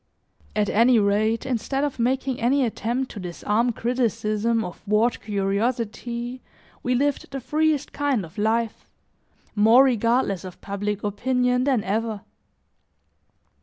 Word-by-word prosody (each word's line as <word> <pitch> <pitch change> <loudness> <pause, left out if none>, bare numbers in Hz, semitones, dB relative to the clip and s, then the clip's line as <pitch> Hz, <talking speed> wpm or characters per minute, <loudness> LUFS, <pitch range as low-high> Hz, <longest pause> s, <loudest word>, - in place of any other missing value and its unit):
At 210 -1 +2
any 235 +4 +4
rate, 215 +2 +1
instead 265 +2 -1
of 285 -4 -2
making 260 +2 0
any 260 +3 +3
attempt 240 +3 -2
to 210 - -8
disarm 210 +6 0
criticism 230 -2 0
or 180 - -5
thwart 215 +3 0
curiosity, 230 +4 -2 0.4
we 250 0 0
lived 285 +2 0
the 275 - -5
freest 300 +2 0
kind 280 -9 0
of 170 +6 -11
life, 225 +1 -1 0.6
more 225 +5 +6
regardless 230 -6 +1
of 185 -2 -9
public 205 +1 -3
opinion 250 +4 +1
than 260 -7 +2
ever. 220 +1 -2
230 Hz, 125 wpm, -24 LUFS, 210-255 Hz, 0.6 s, more